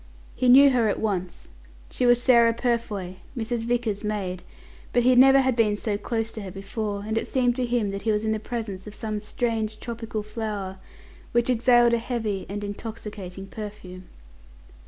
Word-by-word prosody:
He 250 -1 +2
knew 275 +2 +8
her 240 -3 +2
at - - -1
once. 185 -5 -3 0.4
She 250 - +1
was 245 0 +5
Sarah 235 -2 +5
Purfoy, 220 -7 -2 0.2
Mrs. 230 0 -2
Vickers's 235 -4 -1
maid, 195 -4 -3 0.5
but 245 - +3
he 255 +1 +5
never 270 +2 +7
had 260 -2 +1
been 215 -3 +2
so 210 -1 -2
close 225 +2 -2
to 220 - -7
her 195 - -6
before; 200 +2 -4
and 220 +1 0
it - - -5
seemed 245 -2 +1
to 250 -1 0
him 235 -4 0
that 200 0 -5
he 225 - +1
was 210 +1 0
in 220 - +1
the 220 - 0
presence 215 -4 -5
of 210 - -9
some 215 -2 -3
strange 220 0 -2
tropical 225 -2 -5
flower, 210 -3 -5 0.5
which 240 +1 +2
exhaled 240 0 +4
a 235 - +3
heavy 225 -5 -3
and 205 +1 -4
intoxicating 205 -3 -7
perfume. 195 -3 -9
220 Hz, 180 wpm, -25 LUFS, 205-240 Hz, 0.5 s, knew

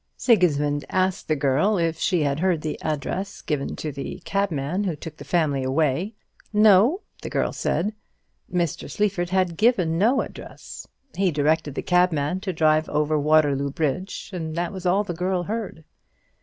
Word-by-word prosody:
Sigismund 150 - +2
asked 185 0 0
the 155 - +2
girl 145 +9 +2
if 165 -2 0
she 175 -5 +1
had 140 0 0
heard 180 -3 +1
the 155 - -4
address 155 +6 -3
given 145 -3 -2
to 155 - -4
the 140 0 -6
cabman 185 -2 -1
who 175 -5 -1
took 155 +1 -9
the - - -9
family 150 -6 +1
away. 155 - 0 0.4
"No," 215 - +5 0.2
the - - -5
girl - - -1
said. 210 +5 -1 0.6
Mr. 175 -3 -1
Sleaford 200 -4 -1
had 185 -3 0
given 190 -8 +2
no 235 +7 +3
address. - - -9 0.3
He 190 -1 +2
directed 150 -1 0
the - - -3
cabman 180 -2 +2
to 190 0 -3
drive 155 -2 +2
over 150 0 +1
Waterloo 145 -2 +3
Bridge, 165 +8 -3
and 160 -3 -4
that 175 +3 -2
was 185 -1 -4
all 195 +4 +3
the 180 - -4
girl 180 +1 -1
heard. 205 -4 -5
170 Hz, 165 wpm, -24 LUFS, 150-190 Hz, 0.6 s, No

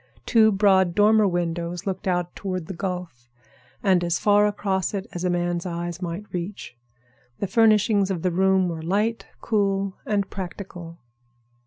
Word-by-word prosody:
Two 220 -2 +5
broad 190 -3 +3
dormer 210 0 +5
windows 175 0 -2
looked 190 -1 -4
out 175 -1 -1
toward 185 -4 -4
the 190 - -6
Gulf, 175 -10 -5 0.5
and 185 -4 +3
as 170 -1 0
far 205 0 +4
across 200 -1 -1
it 195 -1 -3
as 175 - -5
a 180 - +1
man's 175 -1 -1
eye 175 -1 -3
might 175 +3 -4
reach. 180 -6 -5 0.6
The - - -2
furnishings 210 -1 +3
of 180 -4 -3
the 185 - +1
room 190 +1 +3
were 165 -2 -4
light, 210 +7 -1
cool, 195 -3 0
and 200 -2 0
practical. 180 -3 -8
190 Hz, 155 wpm, -24 LUFS, 175-205 Hz, 0.6 s, Two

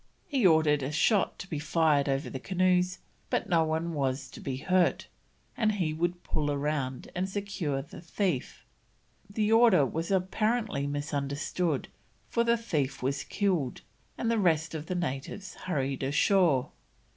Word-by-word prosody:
He 265 - +3
ordered 155 -3 +4
a 135 +2 -2
shot 195 +6 +2
to 195 - -8
be 155 -5 -3
fired 150 -2 +2
over 135 +2 0
the 130 - -5
canoes, 185 +2 +1 0.3
but - - 0
no 165 -2 +3
one 160 +2 -1
was 135 -2 -2
to - - -10
be 130 -2 -4
hurt, 180 +5 +2 0.5
and 215 -3 +2
he 175 -6 -1
would 175 +2 -2
pull 150 -1 -1
round 140 -3 -2
and 185 +2 -2
secure 190 -9 -2
the 145 - -11
thief. 170 - -2 0.6
The 210 +1 0
order 225 - +6
was 165 +5 -3
apparently 200 -3 0
misunderstood, 145 +1 -2 0.4
for 235 - +2
the 235 0 +3
thief 145 - -2
was 135 +1 -1
killed, 180 -11 -1 0.4
and 230 - 0
the 230 - +2
rest 160 -4 +2
of 160 0 -5
the 180 - -2
natives 170 +4 -4
hurried 140 -7 -2
ashore. 145 0 +3
160 Hz, 155 wpm, -29 LUFS, 140-190 Hz, 0.6 s, order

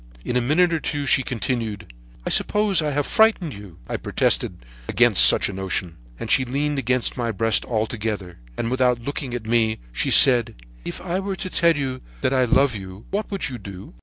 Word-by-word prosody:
In 125 - -3
a 125 - +2
minute 165 +8 +2
or 165 - 0
two 145 -2 -3
she 135 - +3
continued: 110 - -4 0.3
"'I - - -2
suppose 210 -5 +2
I 150 - -1
have 145 0 -1
frightened 220 - +2
you?' 100 -5 -12
I - - -3
protested - - -1 0.2
against - - +5
such - - +7
a 100 - -6
notion, 95 -2 -4 0.2
and - - -5
she 130 - +4
leaned 140 +3 -2
against 125 0 -1
my 120 -2 -2
breast 115 +2 +1
altogether, 110 - -4 0.2
and 115 - -3
without 125 -1 +1
looking 130 0 -5
at 115 -2 -6
me, 110 -1 +1
she - - -2
said: 120 -4 +6 0.3
'If - - -7
I 180 0 -3
were 195 0 -4
to 185 0 -6
tell 170 -3 +3
you 130 -2 -4 0.2
that 130 - +1
I 130 -1 +2
love 130 +1 +2
you, 95 +1 -10
what 205 +2 -3
would 195 -7 -3
you 125 -2 -7
do?' 95 -1 -11
125 Hz, 200 wpm, -22 LUFS, 110-145 Hz, 0.3 s, such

